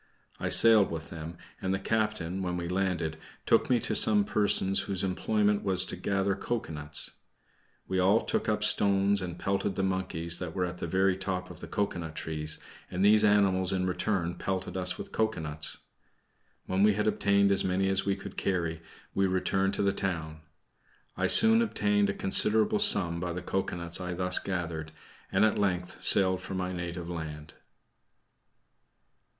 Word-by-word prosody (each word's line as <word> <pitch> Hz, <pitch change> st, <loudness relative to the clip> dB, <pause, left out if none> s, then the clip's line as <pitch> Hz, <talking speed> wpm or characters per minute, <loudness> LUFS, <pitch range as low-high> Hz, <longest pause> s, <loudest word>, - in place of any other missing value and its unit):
I -, -, -2 dB
sailed 110 Hz, -4 st, +6 dB
with 80 Hz, 0 st, -7 dB
them, 85 Hz, +1 st, -8 dB, 0.2 s
and 95 Hz, 0 st, -1 dB
the -, -, -4 dB
captain, 105 Hz, -4 st, -2 dB
when 90 Hz, -1 st, -3 dB
we 85 Hz, -1 st, -4 dB
landed, 90 Hz, -4 st, -2 dB, 0.3 s
took -, -, +2 dB
me 125 Hz, -2 st, +3 dB
to -, -, -1 dB
some 105 Hz, -2 st, +5 dB
persons 100 Hz, -2 st, +3 dB
whose 95 Hz, -2 st, -3 dB
employment 105 Hz, +2 st, 0 dB
was 95 Hz, -2 st, +2 dB
to -, -, -5 dB
gather 95 Hz, +2 st, -1 dB
cocoanuts. 75 Hz, -13 st, -2 dB, 0.8 s
We 95 Hz, -, -1 dB
all 100 Hz, +5 st, +3 dB
took -, -, -1 dB
up 105 Hz, 0 st, -1 dB
stones 100 Hz, -1 st, +3 dB
and 85 Hz, -2 st, -6 dB
pelted 100 Hz, 0 st, -2 dB
the 95 Hz, -, -2 dB
monkeys 95 Hz, -3 st, -2 dB
that 90 Hz, -3 st, -6 dB
were 90 Hz, -2 st, 0 dB
at 90 Hz, 0 st, -7 dB
the -, -, -4 dB
very 95 Hz, +2 st, +1 dB
top 95 Hz, -1 st, -4 dB
of 85 Hz, -, -12 dB
the -, -, -9 dB
cocoanut 85 Hz, -6 st, -3 dB
trees, 75 Hz, -1 st, -3 dB, 0.3 s
and 95 Hz, +2 st, -1 dB
these 105 Hz, +1 st, +5 dB
animals 100 Hz, -3 st, +2 dB
in 95 Hz, -1 st, -1 dB
return 90 Hz, -1 st, -1 dB
pelted 95 Hz, +1 st, -4 dB
us 90 Hz, -1 st, -1 dB
with -, -, -9 dB
cocoanuts. 80 Hz, -9 st, -1 dB, 0.9 s
When 95 Hz, +1 st, -1 dB
we 105 Hz, +1 st, +5 dB
had 105 Hz, +1 st, -2 dB
obtained 100 Hz, -2 st, +2 dB
as 100 Hz, 0 st, +3 dB
many 95 Hz, +1 st, 0 dB
as 95 Hz, 0 st, +2 dB
we 100 Hz, -1 st, -1 dB
could 100 Hz, 0 st, -10 dB
carry, 85 Hz, -4 st, -2 dB, 0.3 s
we 100 Hz, 0 st, +1 dB
returned 95 Hz, +1 st, 0 dB
to -, -, -1 dB
the 100 Hz, -1 st, +1 dB
town. 80 Hz, -6 st, -3 dB, 0.8 s
I -, -, 0 dB
soon 225 Hz, +1 st, +7 dB
obtained 105 Hz, -, +1 dB
a -, -, -1 dB
considerable 105 Hz, +2 st, +2 dB
sum 85 Hz, -4 st, +4 dB
by 90 Hz, 0 st, -4 dB
the 90 Hz, +1 st, -6 dB
cocoanuts 85 Hz, -2 st, -3 dB
I 90 Hz, -1 st, -4 dB
thus 90 Hz, 0 st, +1 dB
gathered, 80 Hz, -4 st, -5 dB, 0.4 s
and -, -, +3 dB
at 110 Hz, -, 0 dB
length 90 Hz, -3 st, -2 dB
sailed 95 Hz, -2 st, +5 dB
for 95 Hz, 0 st, -7 dB
my 90 Hz, 0 st, -3 dB
native 85 Hz, -1 st, -6 dB
land. 80 Hz, -3 st, -7 dB
95 Hz, 170 wpm, -28 LUFS, 85-100 Hz, 0.9 s, soon